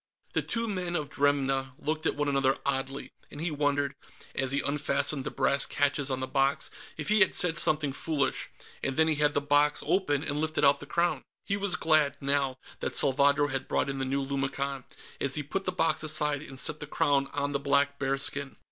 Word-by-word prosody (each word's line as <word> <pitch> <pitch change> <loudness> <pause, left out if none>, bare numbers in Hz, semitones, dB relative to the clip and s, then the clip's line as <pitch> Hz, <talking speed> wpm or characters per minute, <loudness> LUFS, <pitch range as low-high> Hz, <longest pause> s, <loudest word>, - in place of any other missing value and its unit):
The - - +1
two 230 0 0
men 180 -4 -3
of 150 -4 -3
Dremna 135 -2 0
looked 155 +1 -2
at - - 0
one 145 0 -1
another 135 -1 +2
oddly, 135 0 -3 0.2
and 145 - -10
he 165 +1 -2
wondered, 145 -1 0 0.4
as 135 -1 0
he 140 - +1
unfastened 145 -1 +1
the - - -2
brass 140 0 +1
catches 145 -1 +1
on 130 -1 -2
the - - -1
box, 135 +1 0 0.3
if 155 - -4
he 215 0 +4
had 190 - +4
said 175 -2 +2
something 150 -2 +3
foolish, 140 -2 -1 0.3
and 135 -1 -3
then 160 0 +4
he 155 -2 +1
had 150 -1 +2
the 145 - +2
box 145 +1 +2
open, 145 -7 +1
and 145 -1 -3
lifted 155 -1 0
out 140 0 +4
the 145 - -10
Crown. 170 +3 0 0.2
He 200 - 0
was 200 -2 +1
glad, 155 -4 +2
now, 140 -1 0 0.2
that - - -1
Salvadro 140 +2 +4
had 135 0 -3
brought 135 - 0
in 135 - -5
the - - -1
new 135 +1 -1
lumicon, 135 -1 -3 0.3
as 140 -1 +2
he 150 - -1
put 195 +7 -4
the 185 - 0
box 165 -4 +1
aside 150 -2 +2
and 135 -3 -10
set 150 +3 0
the 150 - -7
Crown 140 -2 +1
on 145 0 -2
the 140 - -1
black 140 0 +1
bearskin. 135 0 -1
145 Hz, 210 wpm, -28 LUFS, 135-155 Hz, 0.4 s, he